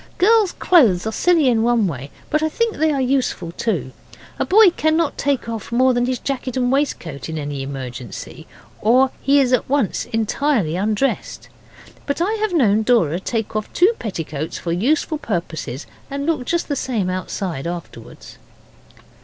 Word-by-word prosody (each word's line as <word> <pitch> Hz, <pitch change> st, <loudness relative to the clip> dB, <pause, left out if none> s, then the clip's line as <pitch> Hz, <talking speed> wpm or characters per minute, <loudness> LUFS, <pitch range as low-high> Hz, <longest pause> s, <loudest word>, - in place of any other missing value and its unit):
Girls' 425 Hz, 0 st, +4 dB
clothes 225 Hz, -, +4 dB
are 220 Hz, -, -1 dB
silly 330 Hz, +3 st, +3 dB
in 235 Hz, -3 st, +3 dB
one 235 Hz, -2 st, +2 dB
way, 140 Hz, -6 st, -4 dB, 0.2 s
but 305 Hz, -, +2 dB
I 315 Hz, -, +1 dB
think 460 Hz, +6 st, -1 dB
they 315 Hz, +1 st, +2 dB
are 280 Hz, -, 0 dB
useful 255 Hz, -10 st, 0 dB
too. 170 Hz, -, -2 dB, 0.5 s
A -, -, +1 dB
boy 405 Hz, -1 st, +7 dB
cannot 315 Hz, -1 st, +1 dB
take 280 Hz, -4 st, -1 dB
off 225 Hz, -1 st, -6 dB
more 255 Hz, +2 st, +3 dB
than 245 Hz, 0 st, +1 dB
his 255 Hz, 0 st, 0 dB
jacket 260 Hz, -2 st, -4 dB
and 250 Hz, -1 st, +1 dB
waistcoat 175 Hz, -, -2 dB
in 160 Hz, -, -4 dB
any 145 Hz, -2 st, -4 dB
emergency, 130 Hz, -4 st, -7 dB, 0.3 s
or 255 Hz, +4 st, +4 dB
he 280 Hz, +1 st, +4 dB
is 255 Hz, -2 st, +2 dB
at 255 Hz, -, +1 dB
once 275 Hz, -7 st, 0 dB
entirely 225 Hz, -, 0 dB
undressed. 210 Hz, +7 st, -1 dB, 0.6 s
But 280 Hz, -, -1 dB
I 375 Hz, +6 st, +1 dB
have 435 Hz, -2 st, 0 dB
known 220 Hz, -, +3 dB
Dora 210 Hz, -9 st, +2 dB
take 220 Hz, +2 st, -3 dB
off 215 Hz, -1 st, -3 dB
two 380 Hz, +6 st, +4 dB
petticoats 160 Hz, -, -4 dB
for 170 Hz, -, -4 dB
useful 290 Hz, -, 0 dB
purposes 165 Hz, -, -4 dB, 0.2 s
and 280 Hz, 0 st, -3 dB
look 305 Hz, -6 st, -1 dB
just 340 Hz, +5 st, -1 dB
the 285 Hz, -, -1 dB
same 230 Hz, -8 st, -1 dB
outside 185 Hz, -4 st, -3 dB
afterwards. 170 Hz, -1 st, -9 dB
240 Hz, 170 wpm, -20 LUFS, 180-285 Hz, 0.6 s, boy